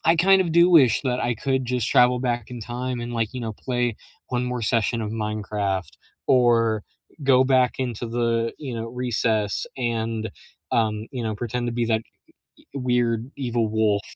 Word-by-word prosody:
I 165 - +4
kind 190 +3 +5
of 175 -3 0
do 170 +2 +5
wish 135 -10 +5
that 125 -2 -1
I 120 - 0
could 130 +3 -1
just 125 -1 -1
travel 125 0 +5
back 120 -2 -2
in 125 -1 -7
time 120 +2 -4
and, 120 0 -5
like, 115 -1 -1
you 125 - -4
know 115 -2 -3
play 120 0 -2 0.3
1 125 -1 -1
more 125 -1 -3
session 115 +1 +1
of 110 -1 -3
Minecraft 105 -3 -2 0.4
or 115 -4 +3 0.4
go 130 -1 +5
back 130 -1 +3
into 120 -2 -3
the, 115 0 0
you 135 -5 -5
know, 115 0 -4
recess 115 -4 -1
and, 115 -3 -2 0.4
um, 110 -1 +1
you 125 -3 -4
know 110 -1 -2
pretend 120 +2 -3
to - - -2
be 120 0 0
that 115 -1 +2
uh - - -16 0.6
e - - -23
weird 120 -3 0
evil 120 -4 0
wolf. 105 -2 +2
120 Hz, 185 wpm, -24 LUFS, 110-125 Hz, 0.6 s, kind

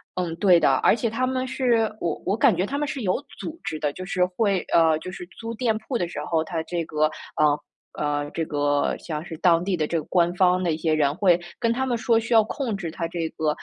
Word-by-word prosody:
嗯， 175 -3 -2
对 180 -2 +5
的， 135 - +4
而 130 - +4
且 230 0 -1
他 245 +4 -1
们 260 0 -1
是 245 -4 +1
我 165 -3 -1
我 200 +4 0
感 235 -7 +4
觉 180 - 0
它 280 - -3
们 295 0 -1
是 275 -3 -4
有 185 +1 0 0.2
组 330 +1 -6
织 155 - -3
的， 150 -1 0
就 185 - -7
是 180 -1 +1
会 195 +1 0
呃， 160 -2 +5
就 185 - -7
是 180 -1 -8
租 230 0 -5
店 230 -2 +1
铺 240 +3 -3
的 175 - -1
时 - - -6
候， 165 -2 +1
它 160 0 -3
这 170 -1 -3
个 155 0 +1 0.3
呃， 150 -1 +3 0.4
嗯， 145 0 -1
这 165 - -2
个 145 -1 0
像 155 -2 -5
是 165 - -7
当 170 -2 +4
地 195 -1 +1
的 155 -3 0
这 165 - 0
个 - - -6
官 175 -1 +2
方 180 0 +3
的 170 - +1
一 155 - -1
些 160 -1 0
人 145 -2 +2
会 180 -2 +4 0.2
跟 230 -1 +2
他 265 +2 -1
们 240 -2 0
说 225 0 +2
需 230 +1 -2
要 225 - +8
控 235 -5 -3
制 175 -4 -4
它 165 0 -4
这 170 -1 -2
个， 160 -1 -1
180 Hz, 275 characters per minute, -24 LUFS, 160-225 Hz, 0.4 s, 要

